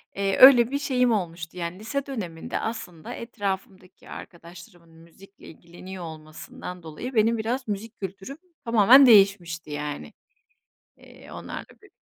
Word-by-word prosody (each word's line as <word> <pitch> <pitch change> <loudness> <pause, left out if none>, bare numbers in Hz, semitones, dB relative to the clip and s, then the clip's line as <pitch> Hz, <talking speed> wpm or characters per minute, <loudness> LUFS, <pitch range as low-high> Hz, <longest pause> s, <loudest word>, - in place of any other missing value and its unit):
Eee, 195 0 -1
öyle 255 -2 +8
bir 280 - -1
şeyim 250 -4 +1
olmuştu. 175 -4 -3
Yani, 175 +2 -5
lise 260 +6 -4
döneminde 185 -12 -5
aslında 180 -8 -6
etrafımdaki 195 -4 -6
arkadaşlarımın 170 0 -12
müzikle 180 +4 -18
ilgileniyor 175 +3 -11
olmasından 160 +3 -10
dolayı 165 - -7
benim 225 +1 +3
biraz 240 +3 -3
müzik 215 +3 -6
kültürüm, 195 - -7 0.3
tamamen 235 +4 +7
değişmişti 195 -8 +4
yani, 145 - -6 0.8
eee, - - -16
onlarla - - -8 0.2
bir - - -19
195 Hz, 125 wpm, -25 LUFS, 170-230 Hz, 0.8 s, öyle